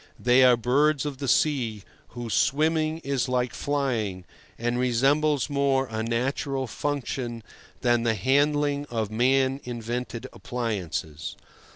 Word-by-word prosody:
They 125 +2 +5
are 125 -1 +6
birds 140 +4 +2
of 140 -3 -4
the 140 - -3
sea, 120 -6 +1 0.2
whose 120 -2 -6
swimming 155 +2 +2
is 135 -2 -1
like 125 -2 0
flying, 115 -10 -2 0.3
and 120 +1 -1
resembles 135 +4 +2
more 140 -2 +1
a 110 0 -2
natural 130 +4 -1
function 125 -3 -3 0.4
than 120 -1 +3
the 115 -1 +1
handling 145 +5 +1
of 110 -3 -2
man 130 +4 +2
invented 120 0 -4
appliances. 90 -10 -4
125 Hz, 125 wpm, -26 LUFS, 115-140 Hz, 0.4 s, are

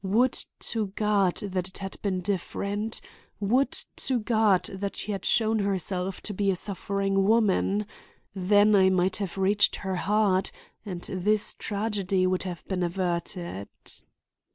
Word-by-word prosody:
Would 230 +7 +3 0.3
to 220 -3 -1
God 205 -4 +2
that 185 -3 -2
it 190 - -7
had 195 -1 -7
been 190 -3 -1
different! 200 +3 -2 0.4
Would 245 +7 +2 0.3
to 255 -2 0
God 215 -4 +3
that 200 +1 -4
she 215 - -3
had 195 -2 -3
shown 220 -1 +3
herself 190 -1 -2
to 210 - -4
be 200 +1 0
a 190 - +2
suffering 195 0 -1
woman! 210 -1 +2 0.5
Then 205 +2 +4
I 190 -1 +6
might 185 0 +2
have 195 -3 -4
reached 200 +2 +3
her 190 -2 -3
heart 205 -1 +2 0.3
and 185 -5 -6
this 205 +3 0
tragedy 200 -3 -1
would 185 0 +1
have 180 -4 -6
been 190 -2 -2
averted." 175 - -2
195 Hz, 145 wpm, -27 LUFS, 185-210 Hz, 0.5 s, I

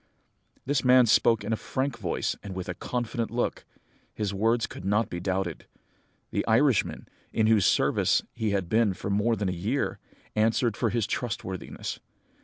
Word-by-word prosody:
"This 140 +1 +1
man 125 -1 +6
spoke 115 0 +4
in 110 +2 -1
a - - +3
frank 130 +5 -2
voice - - -1
and 100 -2 -7
with 95 -1 -5
a 90 - -2
confident 120 +3 -3
look; 120 +1 -2 0.5
his 105 -2 -2
words 115 +4 +2
could - - -9
not 105 +4 +1
be 85 - -3
doubted. 90 -4 -2 0.6
The - - 0
Irishman, 125 +1 +2 0.2
in 110 - +2
whose 110 -3 +4
service - - +3
he 110 - -1
had 100 -3 0
been 110 -1 +2
for 100 - -4
more 105 +3 +2
than 100 -2 -2
a - - 0
year, 105 +11 -2 0.4
answered 110 +1 +2
for 115 - 0
his 115 -1 0
trustworthiness. 105 -5 -4
110 Hz, 170 wpm, -27 LUFS, 95-120 Hz, 0.6 s, man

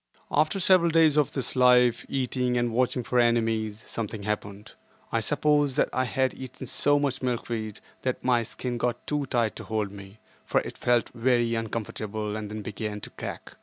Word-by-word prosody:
After 155 +6 +2
several 180 -2 +5
days 160 -2 +4
of 150 -3 +2
this 135 -1 -3
life—eating, 125 0 +3
and 120 -1 0
watching 125 +1 +1
for 125 +1 +1
enemies—something 110 -2 0
happened. 105 -1 -4 0.4
I - - +2
suppose 145 -3 +2
that - - +2
I 130 - +1
had 130 0 0
eaten 130 0 -8
so 145 +3 +2
much 140 -2 -1
milkweed 115 -4 -3 0.2
that 130 -1 -2
my 125 -2 +3
skin 120 +1 -4
got 120 0 -1
too 145 -2 -1
tight 120 -4 0
to - - -7
hold 110 -3 -2
me, 100 0 -11 0.3
for - - +2
it - - -7
felt 120 -1 +2
very 120 -1 +2
uncomfortable 110 -1 -3
and 105 -1 -5
then 105 0 -6
began 105 0 -4
to - - -8
crack. - - -8
120 Hz, 170 wpm, -27 LUFS, 110-130 Hz, 0.4 s, several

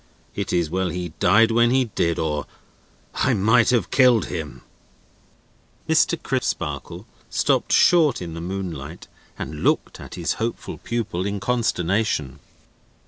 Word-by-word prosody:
It 100 -2 -4
is 85 -2 +1
well 95 0 0
he 90 +1 -4
died 115 +5 +4
when 120 +1 +4
he 130 +1 +2
did, 85 -6 -1
or 75 -3 -2 0.7
I - - +1
might 110 +3 +4
have 120 -7 +1
killed 125 -4 +4
him." 80 -4 -6 1.2
Mr. - - +2
Crisparkle - - -3 0.2
stopped - - +1
short 160 -7 +4
in 85 -2 -6
the 85 - -6
moonlight 85 -4 -6 0.3
and 75 +2 -6
looked - - 0
at - - -9
his 85 -2 -1
hopeful 115 +1 -4
pupil 105 -6 -3
in 100 0 -3
consternation. 100 - -1
95 Hz, 135 wpm, -22 LUFS, 85-115 Hz, 1.2 s, died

